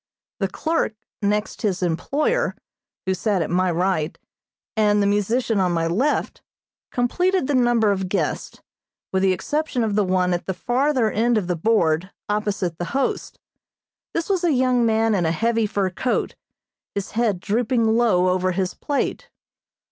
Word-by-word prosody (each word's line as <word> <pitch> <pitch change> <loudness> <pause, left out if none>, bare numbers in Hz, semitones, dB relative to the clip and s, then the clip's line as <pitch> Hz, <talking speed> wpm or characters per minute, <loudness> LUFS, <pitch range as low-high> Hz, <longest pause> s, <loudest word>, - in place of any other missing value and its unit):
The 195 - +1
clerk, 315 - -1 0.3
next 210 +1 -1
his 190 -3 0
employer, 280 - 0 0.5
who 190 - +1
sat 190 -2 0
at 155 - -5
my 185 +1 +2
right, 175 -2 0 0.6
and 210 -1 +3
the 200 - +2
musician 210 +2 +1
on 180 -2 +2
my 165 -1 0
left, 225 - 0 0.5
completed 355 +8 +1
the 290 - -1
number 240 -4 +3
of 190 -2 -2
guests, 180 -6 -2 0.5
with 190 - +2
the 190 0 +4
exception 290 - -1
of 215 -2 0
the 210 0 +3
one 185 -1 +1
at 175 - -3
the 190 - -2
farther 250 +1 +1
end 230 +2 +2
of 205 - 0
the 180 0 -1
board, 170 -2 +1 0.2
opposite 205 -5 -1
the 175 - -2
host. 275 - -2 0.8
This 335 - -1
was 380 -3 0
a 345 - +3
young 250 -2 +3
man 225 0 +2
in 180 -5 +1
a - - +2
heavy 225 +5 +1
fur 200 -3 -1
coat, 245 +7 -1 0.6
his 200 -1 -3
head 220 -5 +1
drooping 230 +4 +1
low 190 -7 +3
over 185 0 +1
his 185 0 -1
plate. 285 -2 -2
210 Hz, 165 wpm, -22 LUFS, 185-240 Hz, 0.8 s, the